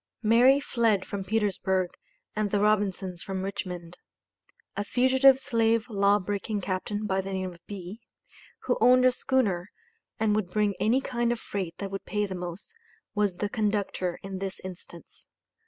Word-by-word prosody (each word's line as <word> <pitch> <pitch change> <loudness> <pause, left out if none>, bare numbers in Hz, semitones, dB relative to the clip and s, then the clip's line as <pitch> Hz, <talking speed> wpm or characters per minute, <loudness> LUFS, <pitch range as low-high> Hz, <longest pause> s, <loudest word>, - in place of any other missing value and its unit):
Mary 245 +5 +6
fled 230 -8 +1
from 200 -2 -4
Petersburg 190 -3 0 0.4
and 215 -1 0
the 205 - +1
Robinsons 195 -4 +1
from 190 -1 -4
Richmond. 180 -3 -5 0.8
A 205 - -1
fugitive 260 +4 +5
slave 230 -2 +1
law 200 0 +4
breaking 205 +1 -3
captain 205 +3 -3
by 190 -1 0
the 195 +1 -6
name 185 -1 -3
of 170 - -17
B., 200 +2 -8 0.6
who 250 - 0
owned 255 +2 +6
a 255 - +6
schooner, 215 -8 0 0.5
and 215 -1 +2
would 210 -4 -1
bring 210 +1 +1
any 240 +5 +3
kind 240 -2 0
of 240 - -2
freight 185 -6 -4
that 195 -1 -5
would 195 - -5
pay 210 -1 0
the 195 - -5
most, 180 - -7 0.4
was 205 -3 +1
the 205 - -1
conductor 205 -4 -1
in 195 -1 -5
this 195 -1 -4
instance. 175 -2 -11
205 Hz, 160 wpm, -27 LUFS, 190-225 Hz, 0.8 s, Mary